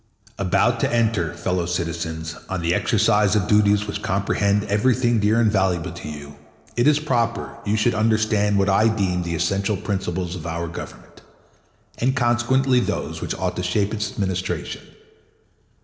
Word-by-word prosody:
3 95 - -2
About 120 +6 +2
to - - 0
enter, 110 -9 +1
fellow 90 -1 -1
citizens, 85 -2 -3
on 95 -2 -2
the 85 +1 +1
exercise 105 +1 +2
of 100 -3 +1
duties 105 -1 +3
which 105 -1 -5
comprehend 100 +1 +1
everything 120 +3 +2
dear 105 +2 +2
and 110 -3 +3
valuable 95 -5 0
to - - -8
you, 75 -1 -9 0.4
it 120 +3 +2
is 150 -1 +5
proper 120 -6 -1
you 105 +2 +1
should 120 +3 +2
understand 110 -2 +2
what 100 0 +2
I 100 +3 +4
deem 95 -5 0
the 85 -1 -3
essential 95 +5 0
principles 90 -2 -3
of 85 -2 -7
our 85 +1 -3
Government, 80 - -10 0.8
and 130 +2 +1
consequently 125 +2 +2
those - - -3
which - - -3
ought - - -2
to - - -1
shape 100 +3 0
its 105 -1 -2
Administration. 95 -2 -3
100 Hz, 165 wpm, -22 LUFS, 90-110 Hz, 0.8 s, is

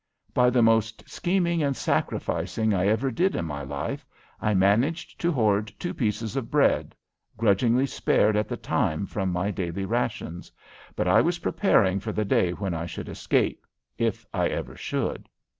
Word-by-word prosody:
By 125 0 +4
the 125 -1 +3
most 115 -1 +2
scheming 175 -2 0
and 140 -2 0
sacrificing 110 -1 -1
I 95 0 +1
ever 110 +6 +1
did 185 +11 +1
in - - -2
my 75 -2 -4
life 70 +1 -4 0.4
I 105 -1 +1
managed 110 - +1
to 175 - +2
hoard 105 -6 +1
two 175 - -4
pieces 110 -1 -2
of 130 -4 -3
bread 145 -1 +2 0.4
(grudgingly 115 +4 +3
spared 110 -5 +2
at 105 0 +1
the - - -4
time 80 +6 -1
from 95 -2 -2
my 90 +3 -1
daily 95 -1 -3
rations), 110 -6 -3 0.4
but - - -1
I - - +6
was 175 +1 +1
preparing 100 - +2
for 105 +2 -4
the 110 - -1
day 95 -2 +2
when 95 0 -3
I 85 +1 -3
should - - -7
escape - - 0 0.3
if - - -1
I - - +1
ever - - -4
should. - - -3
110 Hz, 170 wpm, -26 LUFS, 95-130 Hz, 0.4 s, I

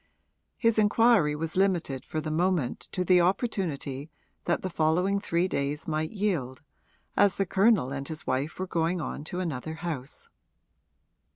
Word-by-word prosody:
His 230 -2 +3
inquiry 210 -7 +4
was 155 +1 -4
limited 175 -9 +1
for 155 - -3
the 155 0 -4
moment 170 -5 0
to 180 -1 -1
the 180 0 +5
opportunity 170 - -1 0.4
that 175 - 0
the 185 - -2
following 175 +5 +2
three 175 -2 0
days 145 -2 -2
might 155 0 -1
yield, 165 - -2 0.5
as 200 -2 +4
the 195 - +1
Colonel 195 - +3
and 140 0 -4
his 155 -1 -5
wife 135 +4 -1
were 185 - -2
going 175 0 0
on 150 - -4
to 180 +3 -4
another 160 -3 -3
house. 155 -5 -5
170 Hz, 155 wpm, -28 LUFS, 150-190 Hz, 0.5 s, the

